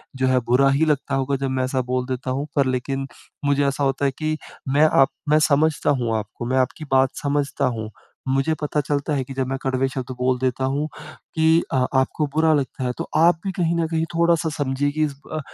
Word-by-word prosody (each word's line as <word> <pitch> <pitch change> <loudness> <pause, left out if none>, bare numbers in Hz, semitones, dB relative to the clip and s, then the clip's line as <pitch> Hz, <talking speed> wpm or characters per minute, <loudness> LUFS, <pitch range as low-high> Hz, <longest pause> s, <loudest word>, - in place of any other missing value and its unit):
जो 130 0 +1
है 130 0 +3
बुरा 135 +2 +5
ही 140 +3 +3
लगता 150 -4 0
होगा 135 +1 0
जब 135 - -1
मैं 130 0 0
ऐसा 130 0 0
बोल 125 0 0
देता 130 0 -3
हूँ। 140 +3 -2
पर 140 - +3
लेकिन 135 +1 -2 0.4
मुझे 140 0 +2
ऐसा 140 +1 -1
होता 135 +1 +1
है 135 - +2
कि 155 0 -1 0.4
मैं 150 +2 +5 0.2
आप 135 - +5 0.2
मैं 155 +1 +5
समझता 150 +2 +2
हूँ 115 -2 0
आपको। 110 +2 -6
मैं 130 +2 0
आपकी 130 +4 -1
बात 130 0 +4
समझता 140 -1 0
हूँ 110 -1 -5 0.4
मुझे 135 +4 +1
पता 150 0 -1
चलता 145 +2 -1
है 135 -2 0
कि 135 +1 -9
जब 130 -1 -2
मैं 135 +1 -2
कड़वे 130 0 0
शब्द 130 -1 -4
बोल 125 0 +1
देता 130 0 0
हूँ 150 +2 -1 0.5
कि 160 0 +3 0.3
अ, 130 -1 +3
आपको 150 +3 0
बुरा 160 0 +4
लगता 135 -2 -1
है 125 - 0
तो - - -4
आप 165 +1 +5
भी 195 - 0
कहीं 170 -2 0
न 165 -1 0
कहीं 160 0 0
थोड़ा-सा 170 -1 +2
समझिए 140 0 0
कि 155 +1 0
इस 145 -2 -2 0.2
अ, 155 - -1
140 Hz, 230 wpm, -22 LUFS, 130-155 Hz, 0.5 s, बुरा